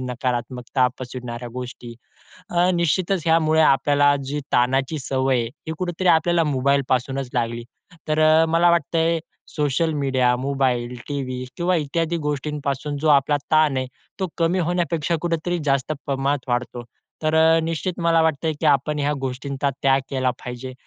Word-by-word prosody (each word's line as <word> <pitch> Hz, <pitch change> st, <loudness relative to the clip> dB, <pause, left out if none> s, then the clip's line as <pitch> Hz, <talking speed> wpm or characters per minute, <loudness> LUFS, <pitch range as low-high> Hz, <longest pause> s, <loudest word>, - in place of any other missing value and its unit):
नकारात्मकता 125 Hz, 0 st, -1 dB
पसरवणाऱ्या 125 Hz, -1 st, -6 dB
गोष्टी 125 Hz, -1 st, -7 dB, 0.6 s
अ, 175 Hz, +1 st, +2 dB
निश्चितच 170 Hz, +1 st, 0 dB
यामुळे 160 Hz, -1 st, +4 dB
आपल्याला 145 Hz, 0 st, +4 dB
जी 145 Hz, +2 st, -3 dB
ताणाची 130 Hz, +5 st, +1 dB
सवय 130 Hz, -1 st, 0 dB
आहे, 115 Hz, -, -1 dB, 0.2 s
हे -, -, -2 dB
कुठेतरी 180 Hz, +1 st, -2 dB
आपल्याला 170 Hz, 0 st, +4 dB
मोबाईलपासूनच 135 Hz, -2 st, 0 dB
लागली. 120 Hz, -1 st, -2 dB, 0.4 s
तर 155 Hz, 0 st, +1 dB
अ, 155 Hz, +1 st, +5 dB
मला 165 Hz, +2 st, +3 dB
वाटतंय 165 Hz, 0 st, +1 dB, 0.4 s
सोशल 150 Hz, +2 st, 0 dB
मीडिया, 130 Hz, -3 st, +1 dB
मोबाईल, 125 Hz, -2 st, -1 dB
टीव्ही 130 Hz, -3 st, -4 dB
किंवा 180 Hz, +1 st, +1 dB
इत्यादी 165 Hz, +2 st, -1 dB
गोष्टींपासून 145 Hz, 0 st, -3 dB
जो 155 Hz, -, +1 dB
आपला 145 Hz, +1 st, +4 dB
ताण 155 Hz, -3 st, +4 dB
आहे, 130 Hz, 0 st, -2 dB, 0.3 s
तो 190 Hz, -, -1 dB
कमी 170 Hz, +2 st, +1 dB
होण्यापेक्षा 170 Hz, -1 st, 0 dB
कुठेतरी 175 Hz, +1 st, -1 dB
जास्त 140 Hz, +1 st, +1 dB
प्रमाणात 140 Hz, -1 st, -1 dB
वाढतो. 120 Hz, 0 st, -2 dB, 0.4 s
तर 155 Hz, 0 st, +1 dB
अ, 160 Hz, +1 st, +5 dB
निश्चित 165 Hz, +3 st, -3 dB
मला 165 Hz, -1 st, +3 dB
वाटतंय, 160 Hz, 0 st, +1 dB
की -, -, -2 dB
आपण 145 Hz, +1 st, +2 dB
ह्या 145 Hz, +1 st, +1 dB
गोष्टींचा 135 Hz, +2 st, -2 dB
त्याग 135 Hz, 0 st, +4 dB
केला 130 Hz, -2 st, 0 dB
पाहिजे 125 Hz, +1 st, -7 dB
145 Hz, 145 wpm, -22 LUFS, 130-160 Hz, 0.6 s, अ